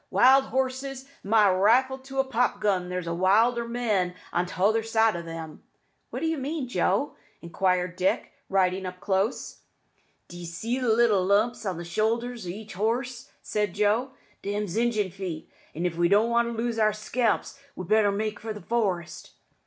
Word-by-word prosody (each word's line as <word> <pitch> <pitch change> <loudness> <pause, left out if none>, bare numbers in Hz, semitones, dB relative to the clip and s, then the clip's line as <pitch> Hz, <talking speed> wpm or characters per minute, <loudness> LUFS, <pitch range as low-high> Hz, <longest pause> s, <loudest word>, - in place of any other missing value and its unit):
Wild 265 +2 +5
horses! 265 0 -2 0.2
my 210 +1 +4
rifle 245 +8 +3
to 270 +1 -10
a 270 - +4
pop 250 -5 0
gun 190 -4 0
there's 180 -1 -4
wilder 215 +8 +2
men 215 -7 0 0.2
on 175 +1 +1
t'other 205 +6 +1
side 225 -1 +2
o' 170 - -3
them." 165 -2 -8 0.5
"What - - -5
mean 315 -1 -2
you, - - -4
Joe?" 275 +3 0 0.2
inquired 180 +1 -1
Dick, 185 +1 0 0.2
riding 185 -1 +1
close 195 +4 -1
up. - - -42
"D'ye 175 0 -8
see 225 +10 -3
the 250 -2 0
little 220 -4 +4
lumps 215 +4 +1
on 185 -3 -2
the 170 - -6
shoulder 225 +7 0
o' 235 -7 -8
each 205 +4 -7
horse?" 235 +5 -2
said 210 -3 -2
Joe. 210 +5 +2 0.3
"Them's 205 -2 -3
Injun's 220 -5 0
feet; 185 -5 -6 0.2
an' 170 +3 -2
if 175 -2 -1
we 170 0 +3
don't 210 +4 +4
want 235 0 +3
to - - -3
lose 230 0 -1
our 215 -1 +3
scalps 225 +4 -1 0.2
we'd 185 - -7
better 215 0 +4
make 210 +1 -2
for 220 0 -5
the 210 - -9
forest." 190 -6 -2
215 Hz, 170 wpm, -26 LUFS, 185-235 Hz, 0.5 s, Wild